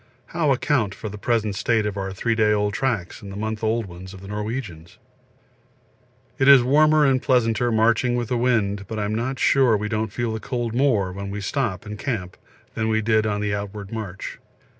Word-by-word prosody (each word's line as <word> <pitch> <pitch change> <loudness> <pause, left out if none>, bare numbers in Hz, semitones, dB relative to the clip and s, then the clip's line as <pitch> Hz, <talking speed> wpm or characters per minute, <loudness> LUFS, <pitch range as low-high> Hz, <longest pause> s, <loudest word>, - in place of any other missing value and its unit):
How 160 -4 +2
account 125 -6 +1
for 110 - -6
the 105 +1 -9
present 110 -2 0
state 110 +2 +1
of 105 -1 -2
our 95 -1 -3
three 115 +5 -1
day 110 -1 +3
old 105 -1 0
tracks 115 -8 -2
and 100 -2 -9
the - - -8
month 110 +1 -4
old 110 +1 +1
ones 95 +1 -10
of 95 - -12
the 95 - -10
Norwegians? 105 -5 -5 1.4
It 135 - +3
is 140 -3 +9
warmer 150 +3 +4
and 130 -2 +3
pleasanter 120 -1 +2
marching 115 +2 +2
with 120 -2 -2
the 125 - 0
wind, 105 -5 +1
but 110 - -5
I'm 105 0 -1
not 125 +4 -2
sure 125 -4 +4
we 105 +1 -3
don't 110 -1 -2
feel 115 +1 -2
the 110 - -3
cold 120 -1 -3
more 120 -8 +2
when 100 +1 -6
we 100 +1 -4
stop 105 -2 -2
and 105 0 -7
camp 105 -10 -3 0.4
than 110 0 -1
we 110 0 +1
did 110 0 +2
on 105 -1 -1
the 105 -1 -1
outward 100 0 -5
march. 105 -5 -6
110 Hz, 205 wpm, -23 LUFS, 100-120 Hz, 1.4 s, is